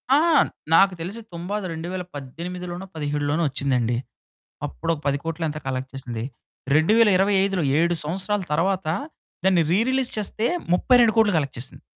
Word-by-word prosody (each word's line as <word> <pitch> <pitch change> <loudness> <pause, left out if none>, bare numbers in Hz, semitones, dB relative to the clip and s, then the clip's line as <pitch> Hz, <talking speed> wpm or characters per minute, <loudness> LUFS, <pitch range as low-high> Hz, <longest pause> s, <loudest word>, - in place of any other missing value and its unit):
ఆ! - - +5 0.5
నాకు 195 +3 +6
తెలిసి 185 +7 -5
'తుంబాద్' 185 +4 -4
2018లోనో, 175 +1 -6
17లోనో 145 +1 -1
వచ్చిందండి. 125 -4 0 0.7
అప్పుడొక 145 - -3
10 140 0 +2
కోట్లో 165 0 -3
ఎంతో 155 0 -5
కలెక్ట్ 130 0 -3
చేసింది. 120 -4 -5 0.5
2025లో, 195 +1 +4 0.2
7 170 +1 +2
సంవత్సరాల 190 +5 -1
తరువాత, 185 +3 +1 0.6
దాన్ని 185 -3 +4
రీ 180 - +4
రిలీజ్ 260 -1 0
చేస్తే 215 +2 -1 0.3
32,00,00,000 225 -1 +4
కలెక్ట్ 140 -3 -3
చేసింది. 130 +2 -6
175 Hz, 120 wpm, -23 LUFS, 145-195 Hz, 0.7 s, నాకు